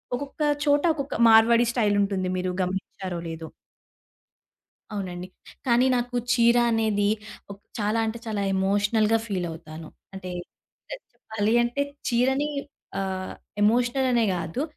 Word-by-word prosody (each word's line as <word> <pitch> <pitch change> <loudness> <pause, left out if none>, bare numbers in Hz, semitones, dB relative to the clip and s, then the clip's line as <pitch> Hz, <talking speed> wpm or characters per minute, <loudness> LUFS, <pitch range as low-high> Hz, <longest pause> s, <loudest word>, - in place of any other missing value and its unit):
ఒక్కొక్క 285 +3 -7 0.2
చోట, 290 0 +3
ఒక్కొక్క 280 -1 -4
మార్వాడి 230 +2 +6
స్టైల్ 210 -4 +2
ఉంటుంది. 195 -2 -1
మీరు 180 0 -1
గమనించారో 185 -1 -4
లేదో. 160 0 -6 1.5
అవునండి. 180 -3 -5 0.4
కానీ 245 +1 +4
నాకు 245 0 -2 0.2
చీర 235 0 +4
అనేది 215 -3 +1 0.4
ఒక్ 200 - -13 0.2
చాలా 210 +2 0
అంటే, 225 +1 -3
చాలా 210 -2 -2
ఎమోషనల్‌గా 210 +3 +2
ఫీల్ 185 -4 -2
అవుతాను. 160 -1 -10 0.3
అంటే 190 -1 -7 0.6
చ - - -6 0.2
చెప్పాలి 220 +1 -1
అంటే, 245 +4 -1 0.3
చీరని 265 +5 +2 0.5
ఆహ్, 190 -1 -3 0.3
ఎమోషనల్ 245 +4 +2
అనే 235 -2 +3
గాదు. 170 - -3
215 Hz, 120 wpm, -25 LUFS, 190-240 Hz, 1.5 s, మార్వాడి